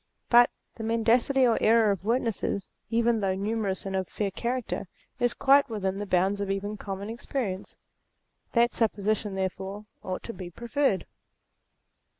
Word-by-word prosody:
But 240 0 +8 0.3
the 225 - -5
mendacity 230 +4 +3
or 235 -2 +3
error 225 -1 +5
of 195 -2 -3
witnesses, 225 -3 -1 0.2
even 235 0 +2
though 195 -2 0
numerous 200 -1 -2
and 195 0 -3
of 190 -1 -1
fair 200 -2 -2
character, 240 0 -3 0.3
is 245 -1 +2
quite 280 0 +5
within 195 -3 -2
the 205 - -4
bounds 190 +2 +2
of 200 - -2
even 200 +2 -2
common 200 -1 -5
experience. 225 -4 -4 0.8
That 235 0 +4
supposition, 210 -2 0
therefore, 190 +2 -3 0.2
ought 185 0 -4
to 230 - -6
be 185 -4 -7
preferred. 235 - 0
215 Hz, 150 wpm, -28 LUFS, 195-235 Hz, 0.8 s, But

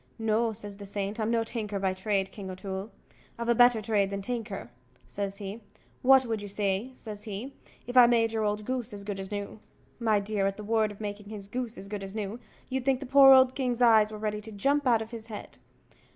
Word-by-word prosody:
"No," 225 +1 +1
says 205 -2 -7
the 200 - -9
saint; 200 +2 -3
"I'm 215 0 0
no 230 -1 +2
tinker 215 -3 -3
by 190 -1 0
trade, 195 0 -1
King 195 -3 -8
O'Toole; 190 +2 -5 0.5
I've 235 0 -3
a - - +6
better 245 -2 +5
trade 205 -2 +1
than 200 0 -4
a - - -11
tinker," 220 - -5 0.3
says 200 -1 -4
he 205 +2 -7 0.4
"what 265 0 +6
would 225 -3 -2
you 205 - -6
say," 200 +3 -1
says 210 -3 -8
he, 220 +6 -6 0.3
"If 245 - -7
I 250 -1 +9
made 230 -1 +3
your 220 -1 -1
old 210 0 -1
goose 250 -2 -3
as 200 -1 -7
good 200 -1 -4
as 190 0 -6
new?" 205 +1 -5 0.4
My 220 -3 +3
dear, 200 -1 0
at 195 - -3
the 210 - -7
word 220 0 +1
of 205 - -12
making 205 -1 -6
his 205 -2 -7
goose 240 +1 -4
as 195 - -8
good 205 0 -5
as 195 +1 -7
new, 215 +2 -4 0.3
you'd 260 -1 -2
think 265 -1 +2
the 275 - -6
poor 270 +1 +8
old 260 -1 +7
king's 250 -3 0
eyes 220 -2 +6
were 215 - -6
ready 210 0 -3
to 220 +1 -9
jump 275 +7 +1
out 230 -3 +4
of 220 - -14
his 225 -1 -7
head. 215 -2 -9
215 Hz, 240 wpm, -28 LUFS, 200-235 Hz, 0.5 s, I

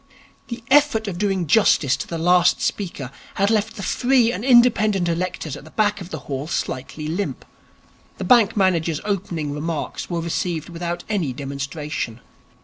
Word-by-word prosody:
The 235 -1 -7
effort 285 -7 +4
of 175 -3 -4
doing 195 -3 0
justice 150 - +4
to - - -5
the 170 - -4
last 175 +1 +4
speaker 160 -10 -3 0.2
had 200 +2 +2
left 220 0 0
the 200 - -6
free 245 +2 +3
and 195 +1 -4
independent 225 -7 +4
electors 170 -3 -2
at 145 - -10
the 155 - -13
back 205 +1 0
of 180 - -8
the 160 -5 -6
hall 140 +1 -5
slightly 150 -1 -4
limp. 180 +6 -3 0.7
The - - -4
bank 235 -5 +4
manager's 170 -5 +1
opening 175 -7 -2
remarks 155 +1 -4
were 170 -2 -1
received 170 -1 -2
without 170 0 -4
any 185 -11 -1
demonstration. 140 -2 -5
175 Hz, 160 wpm, -22 LUFS, 155-210 Hz, 0.7 s, effort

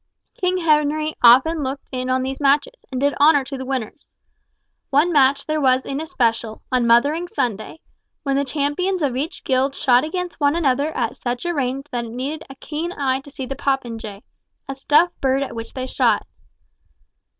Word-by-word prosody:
King 365 0 0
Henry 305 -2 +1
often 265 +7 +6
looked 275 0 -5
in 255 -1 -3
on 255 0 +1
these 265 +1 -4
matches, 290 - +2 0.2
and 255 - -3
did 285 +1 +2
honour 290 -1 +6
to 275 +1 -7
the 260 0 -6
winners. 260 0 -4 0.8
One 305 +6 +3
match 280 -1 +3
there 310 0 -1
was 260 -1 +3
in 275 +2 -3
especial, 230 -9 -1
on 250 -2 +2
Mothering 285 +9 +3
Sunday, 250 - -3 0.4
when 275 -2 0
the 280 - +2
champions 300 +6 -1
of 265 -4 0
each 295 +7 -4
guild 265 +1 +1
shot 255 -3 +3
against 360 +2 -4
one 285 0 +2
another 285 -3 +1
at 235 -3 -2
such 245 +4 -4
a 345 - 0
range 270 -2 -2
that 240 -2 -2
it 225 - -9
needed 275 +5 -4
a 270 - -10
keen 310 +5 -5
eye 265 -5 -1
to 275 - -14
see 270 -1 -6
the 270 - -5
popinjay—a 230 -2 -5
stuffed 295 +6 +2
bird 270 +1 +2
at 270 - -6
which 230 0 -7
they 255 -1 -3
shot. 260 - +1
275 Hz, 185 wpm, -21 LUFS, 255-305 Hz, 0.8 s, often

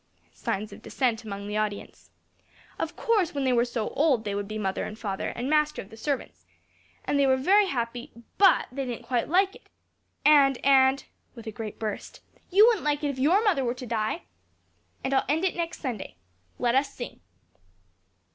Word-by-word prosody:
(Signs 205 +2 -3
of - - -12
dissent 240 -5 -1
among 200 -2 -6
the 210 +1 -2
audience.) 210 -1 -4 0.7
"Of - - -3
course, 415 -10 +1
when 280 - -1
they 260 -1 +2
were 235 -1 +4
so 240 -3 -3
old, 280 -7 +2
they 205 -2 -3
would 200 0 -3
be 215 +1 -5
mother 195 -3 -2
and 215 - -6
father, 200 -4 -3
and 245 +2 -4
master 300 0 +2
of 195 - -8
the - - -10
servants. 275 +4 -4 0.6
And 285 - +1
they 275 - +4
were 260 0 +4
very 390 +9 +4
happy, 240 -5 -3 0.3
but 395 -1 +6
they 270 0 -4
didn't 240 -1 -6
quite 240 +1 -1
like 385 +3 +3
it. - - -18 0.6
And 280 -3 +6
and" 270 0 +5 0.3
(with 230 - -11
a 220 - -4
great 215 -1 -7
burst) 215 -2 -5 0.3
"you 400 +4 +7
wouldn't 455 -6 +3
like 295 0 0
it 290 - +1
if 260 - -8
your 345 +11 +4
mother 370 -11 +2
were 240 0 -1
to 250 - -8
die! 225 +7 -2 0.8
And 270 - -1
I'll 265 - +2
end 320 +5 +1
it 370 - 0
next 335 -1 -4
Sunday. 240 - -5 0.4
Let 240 -1 +1
us 275 +1 +2
sing." 245 - -8
260 Hz, 195 wpm, -27 LUFS, 225-300 Hz, 0.8 s, you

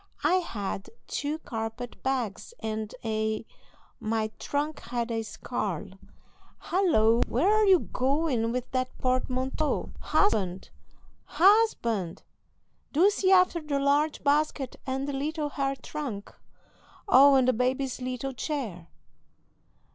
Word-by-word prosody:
I 335 +5 +4
had 205 - -4 0.2
two 295 +2 -2
carpet 230 -3 -6
bags 260 - -2
and 220 -1 -3
a 220 0 -1 0.5
My 220 0 -1
trunk 295 +1 -2
had 235 0 -3
a 225 -1 -1
scarle 205 -3 -4 0.6
Halloo! 240 - +3
where 350 - +2
are 430 0 +4
you 375 -3 +6
going 260 -3 0
with 250 +1 -3
that 255 0 -2
portmanteau? 255 +3 -1
Husband! 190 - +1 0.5
Husband! 320 - +2 0.7
do 360 +8 +5
see 385 -2 +1
after 365 -2 +5
the 300 -2 -2
large 290 +2 +1
basket 290 -2 +1
and 265 +1 -2
the 285 - -3
little 300 +2 -2
hair 275 -1 -1
trunk 260 -6 -6 0.7
Oh, 280 -6 +7
and 260 -1 +4
the 255 - +4
baby's 255 +2 -1
little 255 +1 -3
chair!" 235 - -4
260 Hz, 115 wpm, -28 LUFS, 225-300 Hz, 0.7 s, Oh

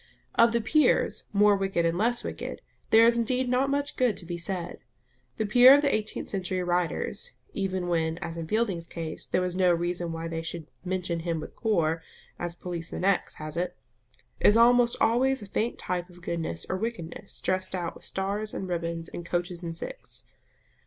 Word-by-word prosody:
Of 230 0 +5
the 235 0 +1
peers, 305 +7 +2
more 205 0 +5
wicked 195 -3 0
and 165 0 +1
less 235 +6 +1
wicked, - - -6 0.3
there 225 +1 +7
is 235 0 +4
indeed 250 +2 +1
not 255 +2 +2
much 285 +1 -1
good 250 -5 +2
to 175 - -6
be 175 +1 -4
said. 175 0 -4 0.6
The 220 - 0
peer 245 +5 +8
of 285 - +2
the 285 - +2
eighteenth 215 0 -2
century 185 -1 -1
writers 175 - -1 0.2
(even 190 -2 -2
when, 165 -1 0
as 165 -1 -5
in 165 -1 -5
Fielding's 195 -5 0
case, 165 -2 -6
there 185 - +1
was 180 -1 -1
no 185 -1 +4
reason 175 0 -1
why 165 0 -4
they 165 0 -3
should 165 -1 -5 0.2
"mention 180 -2 -2
him 165 -1 -2
with 155 - -8
Kor," 165 -8 +1 0.4
as 175 -1 -3
Policeman 175 -1 -5
X. 195 -1 +1
has 155 -1 -7
it) 180 +1 -2 0.6
is 210 - +6
almost 240 0 +5
always 255 +2 +2
a - - -7
faint 220 +4 -1
type 180 0 -3
of 175 -1 -16
goodness 160 - -3
or 185 - -1
wickedness 190 -4 -5
dressed 185 0 -1
out 175 -2 -3
with - - -14
stars 200 +3 -3
and 190 - -4
ribbons 170 -1 -3
and 175 - -7
coaches 175 +1 -2
and 165 -1 -5
six. - - -8
185 Hz, 190 wpm, -28 LUFS, 170-220 Hz, 0.6 s, peer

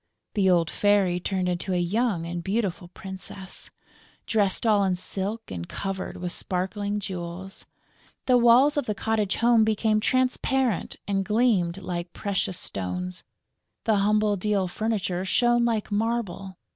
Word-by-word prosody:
The 195 -3 +3
old 170 -3 +3
Fairy 200 -4 +2
turned 185 0 -1
into 180 +1 -2
a 180 - +1
young 190 0 0
and 170 0 -4
beautiful 195 -3 -1
princess, 190 +1 -6 0.6
dressed 205 -1 +1
all 210 -3 +4
in 190 -2 +1
silk 200 +5 -4
and 85 -2 -6
covered 195 -1 -4
with 180 0 -4
sparkling 200 +4 -2
jewels; 185 0 -6 0.6
the 255 - +4
walls 245 +5 +5
of 285 - 0
the 210 - -1
cottage 215 -2 0 0.2
became 215 0 +2
transparent 255 -2 +1
and 195 -1 +1
gleamed 210 -5 +2
like 175 -2 -5
precious 195 -3 -1
stones; 180 - -4 0.6
the 220 -2 +2
humble 210 +1 +2
deal 200 -1 0
furniture 190 -2 -1
shone 240 +4 +3
like 225 -3 -1
marble. 205 -4 -2
195 Hz, 135 wpm, -26 LUFS, 180-220 Hz, 0.6 s, walls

